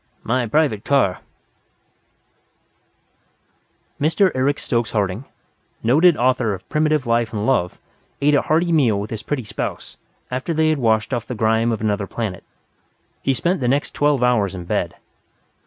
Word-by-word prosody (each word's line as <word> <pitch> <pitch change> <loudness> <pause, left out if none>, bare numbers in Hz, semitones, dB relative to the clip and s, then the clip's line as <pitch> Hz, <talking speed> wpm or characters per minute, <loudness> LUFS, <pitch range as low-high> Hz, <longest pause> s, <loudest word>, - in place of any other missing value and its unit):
My 125 +1 0
private 125 -5 +1
car 130 -10 +2 0.6
" - - -36
Mr. 170 +5 +3
Eric 135 +2 +1
Stokes 120 -4 -1
Harding, 105 +3 -2 0.6
noted 155 +8 +4
author 125 -4 +1
of 95 - -14
primitive 155 -2 +1
life 115 -1 +1
and 105 -1 -3
love, 90 -9 +1 0.4
ate 145 +1 +3
a 145 - +4
hearty 170 +2 +1
meal 125 -11 +3
with 105 +1 -6
his 110 -2 -4
pretty 145 -4 -3
spouse, 105 - -5 0.3
after 130 +6 -2
they 160 0 +3
had 155 -2 +1
washed 110 -3 +1
off 115 - -2
the 125 - -4
grime 110 +1 +2
of 110 - -3
another 105 -2 -1
planet. 105 -5 -4 0.8
He 135 - +1
spent 175 +8 0
the 125 - -1
next 140 +4 0
twelve 145 -3 +2
hours 105 -6 +2
in 90 -2 -7
bed. - - -2
125 Hz, 155 wpm, -21 LUFS, 110-145 Hz, 0.8 s, noted